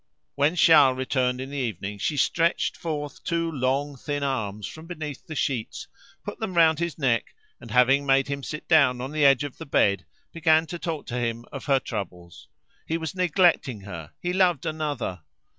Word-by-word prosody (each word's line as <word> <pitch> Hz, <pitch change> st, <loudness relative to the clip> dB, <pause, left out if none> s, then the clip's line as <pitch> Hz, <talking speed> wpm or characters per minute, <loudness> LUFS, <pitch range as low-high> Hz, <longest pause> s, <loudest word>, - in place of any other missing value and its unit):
When 145 Hz, +4 st, +2 dB
Charles 150 Hz, -6 st, +6 dB
returned 130 Hz, -1 st, 0 dB
in 135 Hz, +1 st, -6 dB
the 145 Hz, -, -5 dB
evening, 105 Hz, -4 st, -4 dB
she 150 Hz, +8 st, -1 dB
stretched 170 Hz, +4 st, +1 dB
forth 150 Hz, -3 st, -5 dB
two 165 Hz, -1 st, -1 dB
long 140 Hz, +1 st, -1 dB
thin 145 Hz, +2 st, -4 dB
arms 105 Hz, -7 st, -2 dB
from 160 Hz, +8 st, -9 dB
beneath 155 Hz, -5 st, -7 dB
the 155 Hz, -, -6 dB
sheets, 130 Hz, -7 st, -2 dB, 0.4 s
put -, -, -6 dB
them 215 Hz, -5 st, -4 dB
round 160 Hz, -2 st, +5 dB
his 170 Hz, -1 st, -2 dB
neck, 130 Hz, -6 st, 0 dB, 0.2 s
and -, -, -12 dB
having 135 Hz, +3 st, +4 dB
made 135 Hz, 0 st, +3 dB
him 140 Hz, 0 st, -3 dB
sit 150 Hz, +3 st, -7 dB
down 140 Hz, -7 st, +4 dB
on 130 Hz, +3 st, -5 dB
the 155 Hz, -1 st, 0 dB
edge 135 Hz, -1 st, +5 dB
of 145 Hz, -3 st, -7 dB
the -, -, -8 dB
bed, 100 Hz, -8 st, +2 dB, 0.3 s
began 160 Hz, -1 st, +3 dB
to 175 Hz, +1 st, -7 dB
talk 160 Hz, -4 st, -4 dB
to 125 Hz, -, -3 dB
him 115 Hz, 0 st, -2 dB
of 135 Hz, -, -7 dB
her 135 Hz, -2 st, +3 dB
troubles: 90 Hz, -7 st, -7 dB, 0.4 s
he 165 Hz, -, 0 dB
was 160 Hz, +1 st, -5 dB
neglecting 175 Hz, -, +2 dB
her, 85 Hz, -6 st, -9 dB
he 175 Hz, 0 st, -2 dB
loved 180 Hz, -6 st, +2 dB
another. 150 Hz, -, -3 dB
140 Hz, 190 wpm, -25 LUFS, 125-160 Hz, 0.4 s, Charles